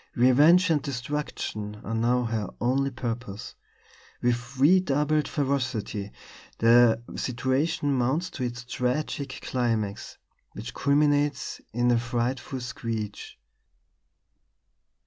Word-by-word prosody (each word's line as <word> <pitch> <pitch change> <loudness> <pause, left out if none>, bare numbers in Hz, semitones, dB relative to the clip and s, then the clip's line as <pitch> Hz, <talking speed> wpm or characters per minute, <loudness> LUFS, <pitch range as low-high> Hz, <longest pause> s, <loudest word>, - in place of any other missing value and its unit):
Revenge 150 +9 +5
and 150 -3 +2
destruction 125 -6 -4
are 115 - -4
now 120 +2 +2
her 110 -4 -2
only 135 +3 +1
purpose. 120 -5 -5 0.7
With 125 +2 -1
redoubled 150 -1 +3
ferocity 125 -8 -2 0.5
the 115 0 +5 0.2
situation 130 +4 0
mounts 140 +9 0
to 130 - -5
its 120 0 -4
tragic 130 +2 -2
climax, 115 -5 -2 0.4
which - - -7
culminates 145 0 +1
in 120 +2 +2
a 120 - +3
frightful 120 +2 -2
screech. 115 -4 -5
125 Hz, 95 wpm, -27 LUFS, 115-140 Hz, 0.7 s, Revenge